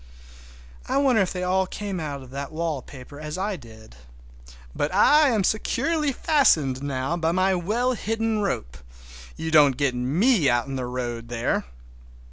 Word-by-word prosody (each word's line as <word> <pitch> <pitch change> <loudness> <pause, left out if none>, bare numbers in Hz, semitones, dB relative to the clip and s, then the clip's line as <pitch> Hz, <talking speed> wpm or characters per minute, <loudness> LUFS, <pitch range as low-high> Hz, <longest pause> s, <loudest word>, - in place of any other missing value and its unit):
I - - 0
wonder 265 -6 +3
if 190 - 0
they 180 -1 -4
all 185 +1 +1
come 200 -2 -5
out 145 -4 -5
of 130 - -14
that 140 +1 -5
wallpaper 145 -4 -5
as 150 +2 -6
I 200 +2 -2
did? 110 - -14 0.8
But 145 - -1
I 290 +10 +5
am 220 -5 +1
securely 285 - 0
fastened 160 - +2
now 140 +2 -2
by 165 -1 0
my 185 +2 +2
well 220 +8 0
hidden 225 -1 -1
rope—you - - -6
don't 145 -5 +5
get 140 -3 +1
me 155 - +2
out 120 0 +1
in 135 - -5
the 130 -2 -3
road 120 -2 -4
there! 120 - -1
160 Hz, 155 wpm, -24 LUFS, 130-205 Hz, 0.8 s, I